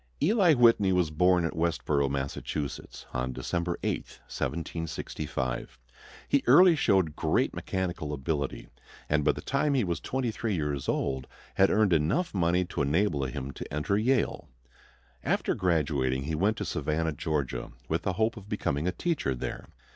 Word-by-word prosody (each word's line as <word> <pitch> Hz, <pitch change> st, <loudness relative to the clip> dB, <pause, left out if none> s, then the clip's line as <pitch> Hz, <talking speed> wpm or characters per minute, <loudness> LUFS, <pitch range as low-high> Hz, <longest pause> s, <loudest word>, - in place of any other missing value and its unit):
Eli 180 Hz, -2 st, +4 dB
Whitney 115 Hz, -6 st, +5 dB
was 90 Hz, -4 st, +2 dB
born 90 Hz, +2 st, +3 dB
at 85 Hz, -, -3 dB
Westborough, 75 Hz, -4 st, +1 dB
Massachusetts, 70 Hz, +1 st, -4 dB
on 60 Hz, +1 st, -1 dB
December 85 Hz, +5 st, -2 dB
8, -, -, 0 dB, 0.3 s
1765. 75 Hz, -6 st, -4 dB, 0.5 s
He 140 Hz, -, +2 dB
early 170 Hz, +7 st, +8 dB
showed 95 Hz, -, +2 dB
great -, -, +1 dB
mechanical 90 Hz, -5 st, -3 dB
ability, 70 Hz, 0 st, -3 dB, 0.4 s
and 75 Hz, 0 st, +2 dB
by 75 Hz, -, +4 dB
the -, -, -7 dB
time 140 Hz, +1 st, +1 dB
he 130 Hz, -, +3 dB
was 85 Hz, -4 st, -1 dB
twenty 130 Hz, -3 st, -2 dB
three 110 Hz, -2 st, -2 dB
years 75 Hz, -4 st, -2 dB
old 65 Hz, -1 st, -1 dB, 0.3 s
had 95 Hz, -, +4 dB
earned 105 Hz, -4 st, +3 dB
enough 85 Hz, -, +1 dB
money 90 Hz, -1 st, +2 dB
to 85 Hz, -, -3 dB
enable 75 Hz, 0 st, +1 dB
him 65 Hz, +1 st, -4 dB
to -, -, -8 dB
enter 75 Hz, +7 st, 0 dB
Yale. 125 Hz, +6 st, +1 dB, 0.7 s
After -, -, +1 dB
graduating 70 Hz, -7 st, 0 dB
he 80 Hz, +3 st, -3 dB
went 100 Hz, +7 st, +1 dB
to -, -, -3 dB
Savannah, 80 Hz, +1 st, -1 dB
Georgia, 75 Hz, -3 st, -2 dB, 0.2 s
with -, -, 0 dB
the 95 Hz, -, -1 dB
hope 110 Hz, +5 st, 0 dB
of 105 Hz, -1 st, -11 dB
becoming 85 Hz, -7 st, -1 dB
a -, -, +2 dB
teacher 115 Hz, -, -1 dB
there. -, -, -5 dB
85 Hz, 155 wpm, -28 LUFS, 75-105 Hz, 0.7 s, early